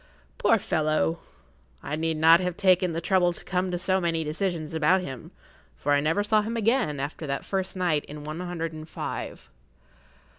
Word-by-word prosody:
Poor -, -, +4 dB
fellow! 155 Hz, -, 0 dB, 0.6 s
I 150 Hz, -, -3 dB
need 160 Hz, 0 st, -1 dB
not 165 Hz, +2 st, +7 dB
have 180 Hz, -2 st, -2 dB
taken 185 Hz, -2 st, +3 dB
the 165 Hz, +1 st, -3 dB
trouble 175 Hz, 0 st, +2 dB
to -, -, -15 dB
come 185 Hz, +1 st, -1 dB
to 180 Hz, -, -1 dB
so 185 Hz, +1 st, 0 dB
many 165 Hz, -2 st, 0 dB
decisions 160 Hz, 0 st, -3 dB
about 160 Hz, +4 st, +3 dB
him, 130 Hz, -8 st, -7 dB, 0.5 s
for 145 Hz, -, -2 dB
I 145 Hz, -, +5 dB
never 160 Hz, +7 st, +1 dB
saw 215 Hz, +1 st, +3 dB
him 225 Hz, +2 st, -3 dB
again 225 Hz, -, +1 dB
after 145 Hz, +3 st, -4 dB
that 140 Hz, 0 st, -3 dB
first 190 Hz, -1 st, -2 dB
night 170 Hz, -5 st, +1 dB
in 150 Hz, 0 st, -9 dB
one 155 Hz, +2 st, -6 dB
hundred 170 Hz, -2 st, -4 dB
and 155 Hz, 0 st, -9 dB
five. -, -, -6 dB
165 Hz, 185 wpm, -26 LUFS, 155-185 Hz, 0.6 s, not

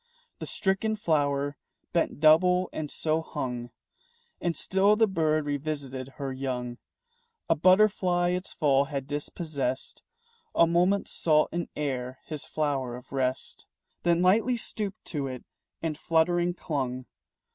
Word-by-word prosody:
The -, -, -5 dB
stricken 200 Hz, +3 st, 0 dB
flower 145 Hz, -6 st, 0 dB, 0.4 s
bent 170 Hz, -4 st, 0 dB
double 180 Hz, +4 st, +5 dB
and 150 Hz, -2 st, -4 dB
so 160 Hz, +2 st, 0 dB
hung. 125 Hz, -6 st, -4 dB, 0.7 s
And 170 Hz, -2 st, -1 dB
still 195 Hz, +2 st, +3 dB
the 225 Hz, +1 st, +5 dB
bird 155 Hz, -5 st, +1 dB
revisited 140 Hz, -3 st, -3 dB
her 135 Hz, -2 st, -4 dB
young. 125 Hz, -2 st, -4 dB, 0.7 s
A -, -, +5 dB
butterfly 185 Hz, 0 st, +4 dB
its 180 Hz, +1 st, -2 dB
fall 140 Hz, -3 st, +3 dB
had 140 Hz, -1 st, -4 dB
dispossessed 145 Hz, -2 st, -3 dB, 0.5 s
A 170 Hz, -, +6 dB
moment 180 Hz, +4 st, +2 dB
sought 155 Hz, -2 st, +2 dB
in 170 Hz, 0 st, -3 dB
air 130 Hz, -3 st, -3 dB
his 155 Hz, -3 st, -4 dB
flower 135 Hz, -5 st, -1 dB
of 125 Hz, -, -12 dB
rest, 130 Hz, -1 st, -2 dB, 0.3 s
Then 170 Hz, 0 st, +2 dB
lightly 225 Hz, +7 st, +4 dB
stooped 210 Hz, -2 st, -5 dB
to 145 Hz, -4 st, -3 dB
it 130 Hz, -1 st, -6 dB, 0.4 s
and 160 Hz, -2 st, -1 dB
fluttering 175 Hz, +2 st, +2 dB
clung. 130 Hz, -6 st, -3 dB
155 Hz, 130 wpm, -28 LUFS, 135-175 Hz, 0.7 s, A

